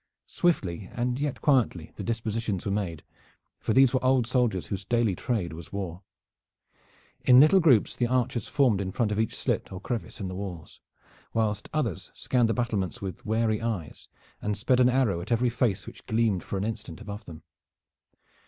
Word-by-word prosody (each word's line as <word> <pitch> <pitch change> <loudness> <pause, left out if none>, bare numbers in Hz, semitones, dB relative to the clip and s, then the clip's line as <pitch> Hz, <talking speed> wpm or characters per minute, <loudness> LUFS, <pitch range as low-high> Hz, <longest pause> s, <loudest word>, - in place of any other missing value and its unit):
Swiftly 95 - 0
and 125 +1 -1
yet 140 -5 -2
quietly 120 - +2
the - - -6
dispositions 110 -2 -2
were 100 - -1
made, 95 -6 -2 0.6
for - - -2
these 130 +2 +5
were 130 - +1
old 130 -2 +3
soldiers 120 -7 +1
whose 100 -1 -4
daily 115 -1 +1
trade 90 -6 -2
was 85 +1 -10
war. 95 -3 -5 1.2
In 125 0 +7
little 155 +7 +7
groups 140 - +4
the 120 - +1
archers 125 -3 0
formed 125 -9 +2
in 95 -1 -3
front 110 +1 0
of 105 - -1
each 110 - 0
slit - - -2
or 95 - -6
crevice 120 +4 -4
in 100 - -3
the 95 - -5
walls, 90 -4 -7 0.6
whilst 105 -2 0
others 125 - -2
scanned 120 -3 +1
the - - +2
battlements 115 -3 -1
with 95 -5 -6
wary 110 0 +1
eyes, 110 -9 -4 0.3
and 105 -1 -1
sped 125 +5 +2
an 125 0 +6
arrow 125 -9 +2
at 90 - -8
every 120 +1 +2
face 115 -5 0
which - - -12
gleamed 110 -4 +1
for 100 - -4
an 95 - -1
instant 110 +1 -5
above 105 0 -8
them. 80 -3 -11
110 Hz, 180 wpm, -27 LUFS, 95-125 Hz, 1.2 s, In